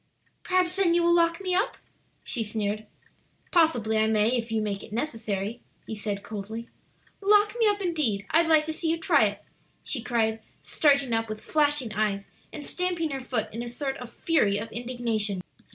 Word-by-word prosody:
"Perhaps, 365 0 +1
then, 355 -3 +3
you 345 - +3
will 345 0 +4
lock 335 -1 +3
me 370 -1 -1
up?" 390 +5 +1 0.5
she 235 - -1
sneered. 215 0 -3 0.6
"Possibly 240 - +3
I 220 - +3
may, 215 0 +3
if 230 -2 -3
you 225 - +1
make 205 -2 -2
it - - -12
necessary," 225 -4 -3 0.2
he 220 - -5
said 205 -1 -4
coldly. 220 +3 -6 0.5
"Lock 415 +1 +4
me 450 - +5
up, 410 -1 +2
indeed! 295 - 0
I'd 330 +2 +4
like 310 -1 +5
to 315 - -3
see 320 +1 -2
you 330 - +1
try 320 - +4
it!" 205 0 -3 0.4
she 255 - -1
cried, 225 -2 0 0.2
starting 280 -5 +2
up 225 0 0
with 215 0 -4
flashing 295 -6 +2
eyes, 200 -1 -1 0.2
and 295 -2 -6
stamping 355 -4 -1
her 270 - -3
foot 225 -5 -3
in 230 - -4
a 240 - -5
sort 270 +3 -3
of 245 -1 -9
fury 235 -10 +2
of 220 +2 -5
indignation. 225 -5 -1
240 Hz, 185 wpm, -27 LUFS, 215-325 Hz, 0.6 s, me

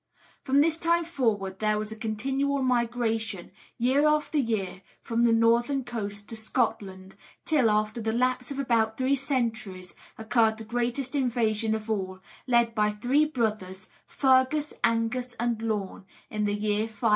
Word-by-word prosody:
From 280 0 +3
this 325 +1 +2
time 340 0 +2
forward, 215 - -1
there 215 -1 +1
was 215 0 -4
a - - -5
continual 265 +6 -1
migration, 230 -6 -1 0.3
year 265 +5 +3
after 300 0 +1
year, 210 -7 -2 0.2
from 235 +1 0
the 235 - +4
northern 235 +4 +3
coast 205 -4 -5
to 225 - -5
Scotland, 200 -4 -2 0.3
till, 285 -8 +3
after 215 +2 0
the 220 0 -1
lapse 250 +1 0
of 280 - -5
about 230 -5 +1
three 260 +1 +1
centuries, 230 -9 -2 0.2
occurred 220 0 +2
the 225 - -8
greatest 245 +4 -2
invasion 230 -5 +1
of 220 0 -6
all, 190 -4 -3 0.3
led 235 -2 +3
by 210 -1 +2
the 210 - -5
three 265 +8 +3
brothers, 210 -9 -3 0.2
Fergus, 265 +3 +2
Angus, 235 +2 0
and 235 -1 -1
Lorne, 210 -4 -3 0.3
in 210 -1 -1
the 205 0 0
year 210 +1 0
503. 220 +1 -1
230 Hz, 155 wpm, -27 LUFS, 215-260 Hz, 0.3 s, the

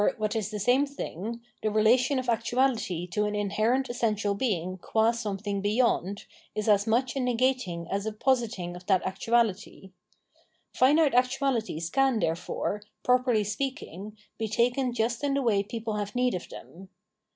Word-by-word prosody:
what 215 0 -1
is 215 -3 -1
the 215 - -4
same 245 +7 +3
thing, 235 - -5 0.2
the 215 - +1
relation 240 +6 +3
of 255 - -2
aotu^ty 230 -6 0
to 210 +3 +1
an 210 0 -2
inherent 215 +6 +1
essential 215 -4 0
being 185 -5 -2
qua 220 +5 +2
something 205 -3 -3
beyoid, 205 -2 +1 0.3
is 215 0 -2
as 205 0 +4
much 245 +3 +1
a - - -1
negating 250 -8 0
as 200 +2 -1
a - - -1
positing 215 -7 -1
of 180 - -10
that 190 -2 +3
actuaj^y^ 210 -1 -1 0.8
Finite 290 +2 +4
actuahties 250 - 0
can, 270 -3 +3
therefore, 180 +3 -2 0.2
properly 250 -3 +3
speakjjg^ 210 - -4 0.3
be 220 - -1
taken 245 +4 +1
just 235 +1 -1
in 280 -1 +1
the 280 - +1
way 210 -5 +3
people 220 +2 -4
have 205 +1 -4
need 250 0 +2
of 180 - -5
them. 185 +2 -12
220 Hz, 155 wpm, -28 LUFS, 200-250 Hz, 0.8 s, as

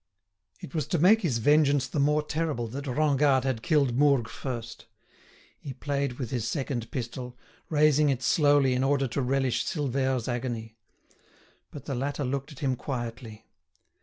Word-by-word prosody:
It - - -10
was 155 -4 -2
to 175 - 0
make 200 +8 +5
his 150 - 0
vengeance 145 +2 +3
the 145 - -3
more 150 +2 +2
terrible 150 -6 -2
that 140 +5 -6
Rengade 140 -1 +2
had 130 -4 -1
killed 140 -5 +2
Mourgue 140 -4 +3
first. 120 -4 -7 0.7
He 135 - -7
played 140 -2 -2
with 125 -2 -6
his 120 -3 -2
second 130 -3 -3
pistol, 125 0 -6 0.3
raising 150 -1 +4
it 130 -2 -1
slowly 145 0 +4
in 125 +1 0
order 135 0 +2
to 140 - -2
relish 130 -1 0
Silvère's 130 -5 -1
agony. 120 -3 -4 0.9
But 145 -2 -10
the 140 - -3
latter 140 +2 -2
looked 140 +3 -3
at 145 - -12
him 135 -3 +1
quietly. 120 -4 -6
135 Hz, 160 wpm, -27 LUFS, 125-145 Hz, 0.9 s, make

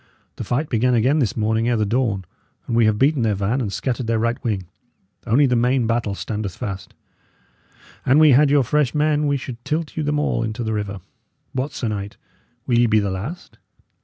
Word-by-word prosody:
The - - -4
fight 140 +6 -1
began 125 0 +2
again 130 +7 +3
this 120 -6 0
morning 110 +2 +1
ere 120 - +2
the 105 - +1
dawn, 105 -4 0 0.4
and 115 - -2
we 115 -1 +4
have 110 -1 +2
beaten 140 +3 +2
their 110 -3 +1
van 105 +7 -1
and 105 -5 -2
scattered 125 +1 -2
their 115 0 +1
right 115 +2 -1
wing. 105 -5 -1 0.6
Only 130 +6 +4
the 125 -2 +2
main 125 +1 +2
battle 115 -3 -1
standeth 105 -4 -4
fast. 95 -2 -6 1.1
An 130 - +4
we 155 -1 +7
had 140 +3 +5
your 145 -1 +4
fresh 145 +1 +1
men, 150 0 +2
we 145 -1 +1
should 125 -2 -8
tilt 155 0 -3
you 160 - -1
them 150 0 0
all 150 - 0
into 110 +1 -3
the 110 -1 -2
river. 100 -2 -4 0.5
What, 130 +3 -2
sir 120 - -3
knight! 100 -1 -5 0.5
Will 120 -2 +2
ye 120 - +4
be 110 -1 +3
the 100 -2 -1
last? 120 - -7
120 Hz, 210 wpm, -21 LUFS, 110-135 Hz, 1.1 s, we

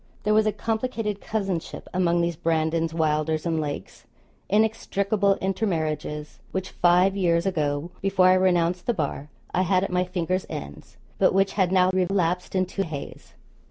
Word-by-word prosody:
There 210 - +2
was 215 0 +4
a - - +3
complicated 225 -2 -2
cousinship 195 -6 -3
among 175 -1 +2
these 170 0 0
Brandons, 160 +1 0
Wylders, 155 0 0
and 165 -2 0
Lakes 145 -1 -6 0.4
inextricable 200 -1 +1
intermarriages, 160 -6 -2
which, 190 0 -3
five 180 +2 +3
years 170 -3 +2
ago, 155 -3 -1
before 190 -1 +4
I - - +7
renounced 180 -1 +2
the 240 - +1
bar, 145 -3 -3 0.2
I 185 - +2
had 185 0 +2
at 195 - -3
my 180 0 +2
fingers' 180 +1 -2
ends, 70 0 -8 0.2
but - - +4
which 195 0 +2
had 190 -3 +1
now 185 -1 +4
relapsed 180 -1 0
into 185 +1 0
haze. 155 -5 -8
180 Hz, 155 wpm, -25 LUFS, 165-195 Hz, 0.4 s, I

